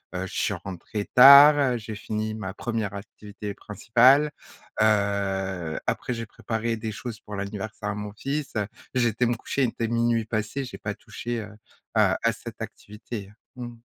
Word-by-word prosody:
heu, 95 - -2
je - - -11
suis - - 0
rentrée 95 +3 -5
tard, 140 0 +9
j'ai 110 -1 -7
fini 110 0 -3
ma 95 -3 -5
1re 110 -4 -3
activité 100 0 -8
principale, 125 +8 +4 0.5
heu, 95 -5 0
après 125 - -1
j'ai 115 -1 -4
préparé 115 +1 -3
des 110 0 -4
choses 110 +1 -7
pour 105 - -8
l'anniversaire 105 +1 -5
à 105 - -2
mon 105 0 -6
fils. 140 +5 -3 0.4
J'ai 120 -2 +3
été 115 +3 0
me 120 - +1
coucher, 135 +4 -2
il 120 - +2
était 115 - -3
00:00 115 -1 +1
passé, 110 +5 -2
j'ai 125 - -8
pas - - -4
touché, 120 0 -5
heu, 105 -1 -10 0.4
à - - +4
à - - +4
cette - - -10
activité. 105 -1 -8 0.2
Mmh. 120 -1 -7
110 Hz, 170 wpm, -26 LUFS, 100-120 Hz, 0.5 s, tard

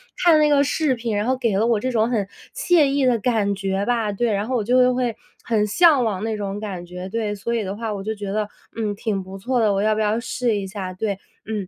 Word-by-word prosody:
看 335 -3 +5
那 300 - +5
个 280 -1 +4
视 290 -1 +1
频， 230 -2 -3
然 210 - 0
后 260 - +2
给 230 -6 0
了 220 - +2
我 230 -3 +2
这 255 +4 -2
种 225 -2 +2
很 210 -5 0 0.3
惬 345 -4 +4
意 275 0 +1
的 245 -2 +3
感 210 -3 +1
觉 195 0 -1
吧。 230 -3 0
对， 230 +3 0
然 200 +2 -1
后 255 - -1
我 220 - -1
就 250 +3 +4
会 245 -3 -1 0.3
很 215 -2 +1
向 295 - +5
往 205 -2 -2
那 220 -1 -2
种 200 0 -4
感 190 -5 -5
觉， 180 +2 -7
对， 215 -1 -2
所 235 +4 -3
以 225 - 0
的 195 0 -4
话 225 0 -4
我 195 -1 -5
就 220 - -2
觉 200 -1 -5
得， 210 0 -1 0.3
嗯， 215 -3 -2
挺 200 -3 -2
不 190 +1 -9
错 250 +4 0
的， 210 -2 +3
我 195 - 0
要 215 0 +2
不 220 - -1
要 215 +1 +1
试 240 -2 -1
一 195 -1 -4
下， 190 -2 -5
对。 200 0 -2 0.3
嗯， 210 -4 -4
215 Hz, 285 characters per minute, -22 LUFS, 200-245 Hz, 0.3 s, 看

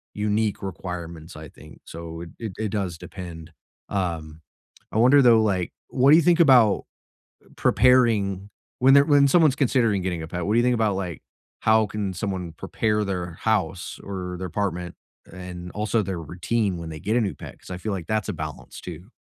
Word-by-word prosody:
unique 105 0 -1
requirements, 85 -3 -7
I 75 0 -9
think. 75 - -16
So, 85 0 -8
it 85 - -8
it 110 -3 -4
it 110 -1 -2
does 95 -5 -3
depend, 85 -3 -9 0.4
um 80 -5 -3 0.5
I - - -2
wonder, 130 +5 +6
though, 115 -3 +6
like, 95 -4 -1 0.2
what 130 +1 +3
do - - +9
you 170 - +5
think 175 +2 +4
about 125 -10 +5 0.7
preparing 110 -7 +3 0.3
when 135 +2 +6
they're 140 0 +7
when 145 -2 +5
someone's 155 -3 +4
considering 120 -7 +2
getting 90 -2 -3
a 80 - -6
pet, 90 +1 -4
what 105 - +1
do 120 - +5
think 125 +1 +2
about, 110 -3 +1
like, 90 -5 -4 0.4
how 110 0 +4
can 105 -2 -4
someone 90 -2 -4
prepare 105 +5 -1
their 90 -3 -3
house, 100 -3 -1
or 90 -2 -5
their 95 +1 -4
apartment, 90 -2 -3 0.4
and 90 0 -8
also 105 +1 0
their 95 -2 -4
routine 90 +5 -1
when 85 -1 -7
they 80 -1 -7
get 105 +8 -1
a 120 - +3
new 100 -4 -1
pet, - - -10
'cause - - -15
I 90 - -4
feel 105 +3 -3
like 90 -4 -5
that's 110 -2 -1
a - - -1
balance, - - -7
too. 90 +3 -9
100 Hz, 190 wpm, -24 LUFS, 90-110 Hz, 0.7 s, do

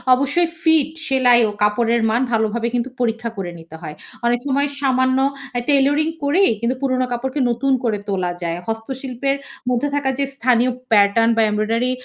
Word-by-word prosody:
অবশ্যই 285 +6 +1
ফিট 320 -3 +3 0.2
সেলাই 250 -3 +4
ও - - -4
কাপড়ের 230 +2 +2
মান 235 +3 +1
ভালোভাবে 225 +1 0
কিন্তু 245 +1 -1
পরীক্ষা 230 0 -1
করে 185 -3 -4
নিতে 165 0 -13
হয়। 155 -3 -7 0.3
অনেক 240 0 +2
সময় 280 +1 +1
সামান্য 260 -1 +2 0.4
আ - - +2
টেইলারিং 285 +2 +3 0.2
করেই 325 +6 +3
কিন্তু 240 +3 0
পুরনো 255 -2 0
কাপড়কে 265 +4 -3
নতুন 270 +3 0
করে 220 -3 0
তোলা 185 -3 -1
যায়। 170 0 -2
হস্তশিল্পের 260 +4 -3 0.3
মধ্যে 250 +3 0
থাকা 285 -2 0
যে - - +2
স্থানীয় 245 0 +2 0.2
প্যাটার্ন 210 +2 +4
বা 225 - +4
এমব্রয়ডারি 225 +4 0
245 Hz, 165 wpm, -20 LUFS, 225-270 Hz, 0.4 s, সেলাই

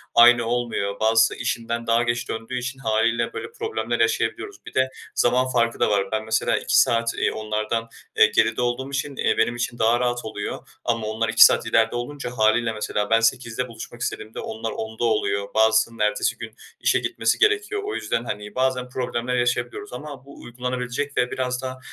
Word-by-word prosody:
aynı 120 0 +7
olmuyor, 115 -4 -2
bazısı 115 +1 +4
işinden 115 0 -3
daha 115 +1 +3
geç 120 0 -2
döndüğü 115 +3 -4
için, 125 +2 -4
hâliyle 115 0 +1
böyle - - -6
problemler 450 -1 -3
yaşayabiliyoruz. 425 -2 -1
Bir - - -10
de 130 0 +2 0.3
zaman 125 +1 +3
farkı 115 -2 0
da - - +3
var. 100 -2 0
Ben 110 0 -1
mesela 110 0 +1
2 - - +2
saat, 115 0 +2
eee, - - +1
onlardan, 110 +1 -2 0.3
eee, - - +8
geride 115 +2 +3
olduğum 125 +2 -1
için, 140 0 -3
eee, - - +1
benim 115 +1 +2
için 120 0 -3
daha 115 +2 +3
rahat 120 -1 -1
oluyor. 105 -2 -5 0.2
Ama 115 -2 -1
onlar 110 +1 -1
2 - - +9
saat - - +3
ileride 110 +1 +2
olunca, 125 +1 -5
hâliyle 110 +2 +3
mesela 105 -1 -2
ben 115 0 +5
20.00'de 115 +1 0
buluşmak 115 0 -10
istediğimde 110 -1 -4
onlar 110 +1 -4
22.00'da 110 +1 -5
oluyor, 100 -3 0
bazısının 110 +1 +3
ertesi 105 +3 +1
gün 115 -2 -7 0.3
işe - - +2
gitmesi - - 0
gerekiyor. 425 -1 +2
O 415 - -3
yüzden, 115 - -2
hani, 105 -2 -6
bazen 130 -1 0
problemler 125 -1 -2
yaşayabiliyoruz. 265 - -1
Ama 145 -3 -8
bu 140 - -13
uygulanabilecek 125 +3 -4
ve 125 - +1
biraz 125 -1 -2
da, 130 0 -5
120 Hz, 185 wpm, -23 LUFS, 110-125 Hz, 0.3 s, 2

